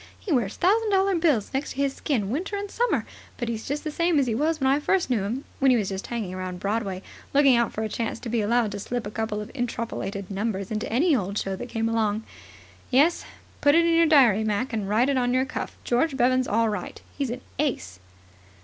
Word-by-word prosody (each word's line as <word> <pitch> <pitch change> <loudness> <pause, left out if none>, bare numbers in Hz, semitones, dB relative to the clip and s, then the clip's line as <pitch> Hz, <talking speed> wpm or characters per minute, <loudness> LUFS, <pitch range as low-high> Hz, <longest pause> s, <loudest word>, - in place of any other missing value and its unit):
He 395 - -6
wears 225 -7 0
thousand 430 +5 +2
dollar 390 0 +3
bills 310 - +1
next 270 +2 -2
to - - -17
his 275 -1 +1
skin 220 -11 -1
winter 370 - -2
and 405 0 -4
summer. 485 +1 0 0.3
But 240 -2 -3
he's 225 -1 -4
just 290 +2 -2
the 310 - -3
same 335 +1 +1
as 280 - +3
he 235 - -1
was 310 +7 0
when 265 - 0
I 270 +2 +4
first 340 -1 +1
knew 230 -5 +2
him, 230 +8 -3 0.2
when 270 - +4
he 250 - +5
was 205 -4 -1
just 195 0 -5
hanging 220 -6 -4
around 185 -1 -5
Broadway, 200 -2 -2 0.3
looking 275 -3 +6
out 235 -1 +2
for 220 - -3
a - - -1
chance 230 +1 -3
to - - -6
be 230 -1 +1
allowed 225 +1 +1
to 205 - -5
slip 240 +3 -3
a 205 - -5
couple 215 -1 -2
of 210 - -8
interpolated 230 -6 -4
numbers 200 -1 -2
into 215 0 -3
any 295 +7 +3
old 200 -3 -2
show 195 -1 -2
that 240 +6 -7
came 225 0 -1
along. 220 -1 0 0.7
Yes. 290 +7 +3 0.4
Put 290 +1 +5
it 335 0 +5
in 335 - +3
your 330 0 +5
diary, 245 -9 +5
Mac, 220 +4 -1
and 205 -3 -2
write 225 +5 +3
it 280 -1 +1
on 245 0 +1
your 260 +1 +2
cuff, - - -5
George 265 +4 +1
Bevan's 255 0 +3
all 225 +2 +2
right. 205 -4 -5 0.2
He's 280 -3 -2
an 250 +2 -5 0.2
ace." 95 - -2
240 Hz, 240 wpm, -25 LUFS, 210-285 Hz, 0.7 s, looking